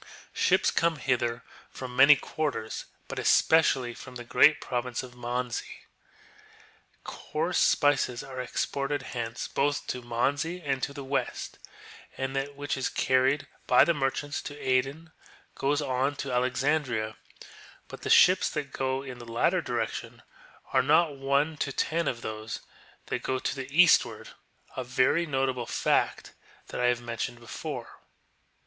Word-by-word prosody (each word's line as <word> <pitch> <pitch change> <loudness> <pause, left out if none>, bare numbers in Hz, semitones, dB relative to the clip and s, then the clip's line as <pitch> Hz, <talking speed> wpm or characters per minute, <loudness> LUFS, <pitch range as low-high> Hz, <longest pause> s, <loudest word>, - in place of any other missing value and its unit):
Ships - - +3
come 170 -1 +2
hither 125 -3 -1 0.3
from 125 -1 -8
many 140 +3 +8
quarters, 145 -6 -3 0.2
but - - -5
especi 160 0 +4
ally 125 -3 -5
from 125 +1 -11
the 120 - -6
great 150 +5 +5
province 125 -1 -3
of 125 -1 -10
Manzi.^ 125 0 -3 1.4
Coarse - - -2
spices 135 -4 +2
are 130 -1 -6
exported 140 +3 -2
hence 115 -1 -4
both 145 +1 0
to 125 - -4
Manzi 140 +9 -1
and 135 -5 -2
to - - -2
the 140 0 -7
west, 135 -2 -3 0.6
and 135 0 -3
that 140 +1 -2
which 145 0 -3
is 130 - -1
carried 130 +2 +2 0.2
by - - +7
the 170 - +3
merchants 145 +1 -2
to 145 - -8
Aden 135 +5 -1 0.4
goes 145 +2 0
on 135 +1 0
to 140 -1 -4
Alexandria, 125 -3 0 0.7
but - - -10
the - - -4
ships 185 +1 +6
that 145 -3 -5
go 130 0 -1
in 130 -3 -8
the 120 -1 -10
latter 115 - +2
direction - - -4 0.5
are - - +5
not 155 +2 +3
one 140 +3 0
to 140 - -2
ten 165 +5 0
of 120 - -2
those 110 +1 -5 0.4
that - - -3
go 130 - -1
to 130 - -2
the 135 -1 -6
eastward; 130 -9 +4 0.5
a 130 - -3
very 130 +7 +2
notable 135 -4 -1
fact - - 0 0.4
that - - -4
I - - +2
have 120 0 +2
mentioned 120 0 -4
before. 115 -1 -7
135 Hz, 150 wpm, -28 LUFS, 125-145 Hz, 1.4 s, many